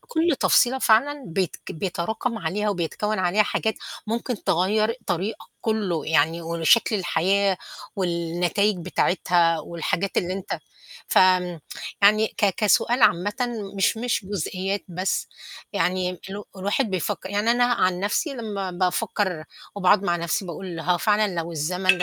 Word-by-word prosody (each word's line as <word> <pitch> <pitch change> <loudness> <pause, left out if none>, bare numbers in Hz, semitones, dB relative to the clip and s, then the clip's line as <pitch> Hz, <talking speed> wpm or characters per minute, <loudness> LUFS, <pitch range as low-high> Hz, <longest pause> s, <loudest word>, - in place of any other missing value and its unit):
كُلّ 345 - 0
تفصيلة 260 +2 +4
فعلًا 270 +5 +3
بيت 180 0 -2
بيتراكم 195 +7 -3
عليها 200 +4 -1
وبيتكوّن 200 +3 -2
عليها 185 +3 +3
حاجات 220 +1 -1 0.3
ممكن 230 0 -3
تغيّر 215 +6 +2
طريقك 195 +5 -2
كُلّه، 205 -7 -1
يعني 160 +1 +2
وشكل 170 +7 +3
الحياة 190 +1 +1 0.4
والنتايج 175 +3 0
بتاعتها 175 -1 +2
والحاجات 170 +4 -3
اللي 180 +1 +1
أنت 190 0 -4 0.5
ف - - +5
آمم، 180 -3 +3 0.4
يعني 215 +2 +6
ك 210 - 0
كسؤال 230 +3 +2
عامةً 185 +5 +3 0.4
مش 195 - +2
مش 235 -2 -1
جزئيات 195 +1 -3
بس، 185 +2 -1 0.5
يعني 185 -1 0 0.2
ال 200 +1 -5
الواحد 205 +5 0
بيفكّر 185 +1 -3
يعني 205 +3 +1
أنا 245 +1 +4
عن 185 -7 +1
نفسي 205 - 0
لمّا 205 -6 -4
بافكّر 185 -1 -1 0.3
وباقعد 200 0 +3
مع 175 -3 +1
نفسي 170 +4 -1
باقول 175 -1 -6
هو 175 +2 +1
فعلًا 210 -2 +2
لو 170 0 -3
الزمن 180 +3 +2
190 Hz, 135 wpm, -24 LUFS, 175-215 Hz, 0.5 s, يعني